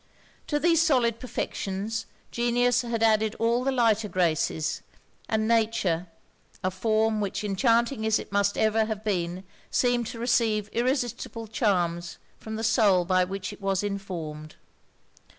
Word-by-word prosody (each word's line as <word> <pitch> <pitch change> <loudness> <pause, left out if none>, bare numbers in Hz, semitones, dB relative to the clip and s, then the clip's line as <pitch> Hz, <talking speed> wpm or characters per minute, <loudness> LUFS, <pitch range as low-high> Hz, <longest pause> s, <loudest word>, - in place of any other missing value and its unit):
To 295 - 0
these 330 0 +4
solid 245 -8 +2
perfections, 215 -3 -4 0.2
genius 240 +1 +2
had 235 -2 -2
added 220 -1 +3
all 235 +2 +1
the 270 - +1
lighter 225 -4 +2
graces; 160 -3 0 0.5
and 220 0 +1
nature, 215 -7 +1 0.6
a 185 - +1
form 215 +2 +1
which, 205 +1 -3
enchanting 230 +4 +1
as 220 - +3
it - - -8
must 200 0 +1
ever 220 0 +2
have 215 -1 -4
been, 180 -3 -2 0.3
seemed 245 -2 +1
to 230 - -7
receive 225 -3 +1
irresistible 240 -2 -1
charms 175 -6 -1 0.2
from 220 0 -6
the 220 - -4
soul 205 -5 +3
by 185 0 +3
which 190 +2 -5
it 205 - -14
was 195 0 0
informed. 170 -7 -5
220 Hz, 140 wpm, -26 LUFS, 195-235 Hz, 0.6 s, these